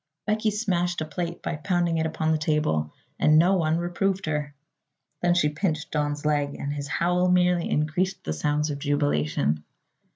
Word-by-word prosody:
Becky 215 0 +1
smashed 180 -5 0
a - - -1
plate 170 +3 -5
by 165 - -2
pounding 170 0 0
it 160 - +1
upon 160 0 -1
the 155 - +1
table 150 - 0 0.3
and 155 0 +5
no 175 +4 +5
one 160 -3 +1
reproved 185 +3 -1
her. 150 -2 -2 0.7
Then 175 0 +3
she 150 -4 +3
pinched 155 0 -2
Don's 145 -1 -1
leg 145 -1 +1
and 140 +1 -4
his 145 -1 -4
howl 180 +4 +1
merely 180 -1 +3
increased 175 +6 0
the 80 - -2
sounds 150 - 0
of 140 - -4
jubilation. 80 - 0
155 Hz, 170 wpm, -25 LUFS, 145-175 Hz, 0.7 s, and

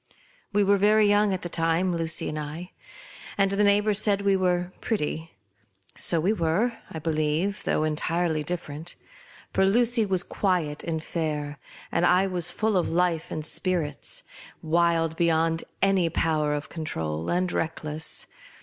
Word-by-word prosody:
AVe 205 - +5
were 200 0 +3
very 210 +1 +5
young 205 0 +3
at 185 - -3
the - - -3
time, 170 +2 0
Lucy 165 -1 0
and 155 - -4
I, 155 +4 -6 0.7
and 195 -1 +3
the 200 +1 +2
neighbours 205 0 +3
said 200 -2 +1
we 200 -1 +3
were 180 -1 0
pretty. 160 - -3 0.6
So 170 - +2
we 185 +7 +2
were, 200 +6 0
I - - -7
believe, 155 +5 -1
though - - +1
entirely 160 +1 0
differ 170 -1 -4
ent; 160 +4 -6 0.6
for - - +3
Lucy 230 +4 +3
was 185 -2 +1
quiet, 175 -7 -1
and 160 -2 -3
fair, 150 -4 -3 0.3
and - - +1
I 180 +2 +4
was 180 -3 +1
full 215 -2 0
of 180 - +1
life 170 -1 0
and 155 - -4
spirits; 165 -4 -1 0.4
wild 165 0 +1
beyond 165 -1 +2 0.2
any 195 -3 +3
power 155 -2 +1
of 145 - -5
control, 80 - -4
and 180 +1 0
reckless. 160 -1 -3
170 Hz, 155 wpm, -26 LUFS, 160-195 Hz, 0.7 s, AVe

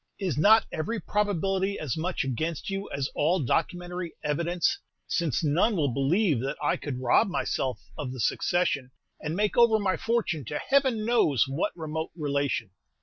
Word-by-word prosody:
Is 185 -8 -2
not 215 +9 +6
every 220 +8 -2
probability 195 -1 0
as 150 -6 -3
much 175 +3 -1
against 155 - -3
you 195 +1 -4
as 140 -1 -1
all 170 +5 +2
documentary 175 +5 -2
evidence, 170 - 0 0.3
since 170 -3 0
none 170 +9 +2
will 150 -6 +1
ever - - -5
believe 150 - +2
that 135 +3 -3
I 145 - +1
could 135 -4 -5
rob 130 - +3
myself 130 -7 -1 0.2
of 130 -4 -3
the 130 - -7
succession, 145 -1 0 0.3
and 155 +2 -3
make 210 +2 0
over 235 -2 +6
my 200 -3 0
fortune 225 -10 -1
to 150 - -3
Heaven 260 -5 +1
knows 220 - +3
what 135 +5 -1
remote 160 0 -4
relation?" 140 - -1
170 Hz, 165 wpm, -27 LUFS, 145-200 Hz, 0.3 s, not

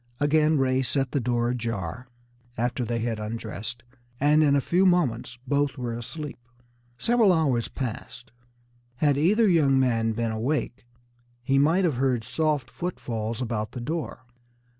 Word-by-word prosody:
Again 150 +1 +3
Ray 130 -1 +2
set 135 0 -1
the 140 - +1
door 120 -1 0
ajar, 115 -2 -4 0.5
after 120 +2 -1
they 120 0 -2
had 115 -1 -2
undressed, 110 +2 -5 0.4
and 150 +2 +4
in 145 -2 +4
a - - +4
few 175 +7 +2
moments 130 -10 +1
both 145 +1 0
were 120 -2 -3
asleep. 140 +5 -6 0.6
Several 230 - +3
hours 140 -9 +1
passed. 125 0 -6 0.6
Had 145 +2 +2
either 205 +10 +3
young 145 -7 +4
man 115 -3 +1
been 115 0 -1
awake, 120 +2 -2 0.6
he 135 +2 +2
might 165 +7 +3
have 150 -8 0
heard 125 -3 +1
soft 150 0 0
footfalls 115 -9 -4
about 110 -2 -3
the 125 - -5
door. 150 0 -4
130 Hz, 145 wpm, -26 LUFS, 115-150 Hz, 0.6 s, and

